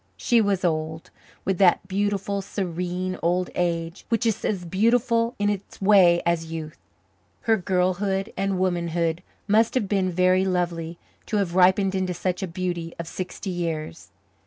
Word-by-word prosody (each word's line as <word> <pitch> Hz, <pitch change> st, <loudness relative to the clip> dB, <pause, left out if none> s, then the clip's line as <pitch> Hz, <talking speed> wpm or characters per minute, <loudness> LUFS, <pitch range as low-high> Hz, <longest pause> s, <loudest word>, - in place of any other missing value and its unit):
She 235 Hz, -3 st, +3 dB
was 195 Hz, -3 st, 0 dB
old, 160 Hz, -1 st, -2 dB, 0.3 s
with 190 Hz, -2 st, 0 dB
that 190 Hz, 0 st, +4 dB
beautiful, 200 Hz, 0 st, -1 dB
serene 180 Hz, -1 st, -3 dB
old 180 Hz, +2 st, 0 dB
age 170 Hz, 0 st, -2 dB
which 230 Hz, +1 st, +1 dB
is 220 Hz, -1 st, 0 dB
as 185 Hz, -4 st, -1 dB
beautiful 230 Hz, +5 st, +2 dB
in 205 Hz, -, 0 dB
its 205 Hz, -1 st, -3 dB
way 190 Hz, -4 st, +5 dB
as 165 Hz, -1 st, 0 dB
youth. 155 Hz, -5 st, -6 dB, 0.6 s
Her 225 Hz, -, +3 dB
girlhood 190 Hz, +2 st, 0 dB
and 195 Hz, -1 st, -1 dB
womanhood 170 Hz, -2 st, 0 dB, 0.3 s
must 220 Hz, +4 st, +3 dB
have 220 Hz, -6 st, +1 dB
been 190 Hz, -2 st, +1 dB
very 185 Hz, +1 st, +3 dB
lovely 175 Hz, -3 st, -2 dB, 0.3 s
to 215 Hz, -, 0 dB
have 190 Hz, -4 st, 0 dB
ripened 190 Hz, +1 st, +4 dB
into 185 Hz, -2 st, -1 dB
such 180 Hz, +2 st, -2 dB
a 190 Hz, -, -2 dB
beauty 175 Hz, -1 st, -4 dB
of 170 Hz, -, -6 dB
sixty 185 Hz, +2 st, -5 dB
years. 165 Hz, -2 st, -4 dB
185 Hz, 155 wpm, -24 LUFS, 170-200 Hz, 0.6 s, way